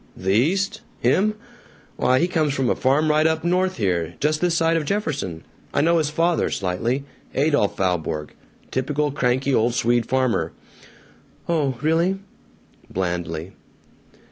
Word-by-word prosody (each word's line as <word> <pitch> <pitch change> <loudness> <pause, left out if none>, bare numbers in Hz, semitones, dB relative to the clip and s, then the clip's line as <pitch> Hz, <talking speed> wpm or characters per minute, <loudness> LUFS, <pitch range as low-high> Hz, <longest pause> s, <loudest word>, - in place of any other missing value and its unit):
"The 95 +1 -1
East? 195 - +1 0.2
Him? 215 +3 +2 0.6
Why, 130 +1 +3
he 170 - +2
comes 155 -5 0
from 130 -3 +1
a - - +1
farm 145 +4 +2
right 155 +1 +4
up 160 0 0
north 185 +1 +1
here, 90 -6 -1
just 150 +1 +1
this 175 -2 +2
side 165 0 +2
of 165 - +1
Jefferson. 145 - -2 0.3
I - - +4
know 170 +2 +3
his 150 -2 0
father 165 +3 +1
slightly 115 +9 -1 0.3
Adolph 145 -7 +2
Valborg 80 -5 -1 0.4
typical 145 +3 0
cranky 130 0 +1
old 120 0 +2
Swede 120 -1 +2
farmer." 130 -2 0 0.9
"Oh, 145 -7 0
really?" 165 +5 +2 0.7
blandly. 85 -2 -3
140 Hz, 140 wpm, -23 LUFS, 110-165 Hz, 0.9 s, right